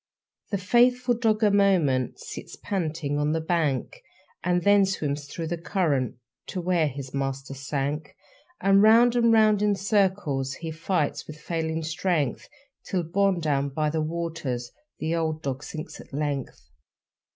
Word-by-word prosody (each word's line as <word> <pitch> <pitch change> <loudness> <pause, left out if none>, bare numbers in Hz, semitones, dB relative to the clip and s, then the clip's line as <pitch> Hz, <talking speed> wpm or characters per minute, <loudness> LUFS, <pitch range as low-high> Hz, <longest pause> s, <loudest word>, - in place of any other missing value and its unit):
The 200 - 0
faithful 245 +5 +3
dog 225 -2 +1
a 210 - +5
moment 175 - +2
Sits - - -8
panting 160 -6 -2
on 150 +1 +1
the 160 - +1
bank, 160 -5 -1 0.4
And 180 -1 +1
then 200 +1 +6
swims 150 -7 -2
through 165 +3 -5
the 170 +1 -3
current 155 - 0 0.3
To 185 - -4
where 175 -3 +2
his 135 -1 -7
master 135 0 -3
sank. 140 +2 -3 0.4
And 195 0 +5
round 230 +3 +6
and 235 -1 +4
round 215 -2 +5
in 210 -1 +3
circles 190 -10 0
He 165 +2 -6
fights 155 -2 -1
with 155 - -9
failing 160 -1 -2
strength, 160 -4 -1 0.3
Till, 185 -2 -1
borne 190 +2 +1
down 140 -3 0
by 150 +2 -1
the 160 0 0
waters, 155 -7 -3 0.3
The 160 - -2
old 160 -1 -1
dog 135 0 -3
sinks 155 0 -7
at - - -17
length. 135 - -4
160 Hz, 150 wpm, -26 LUFS, 145-195 Hz, 0.4 s, then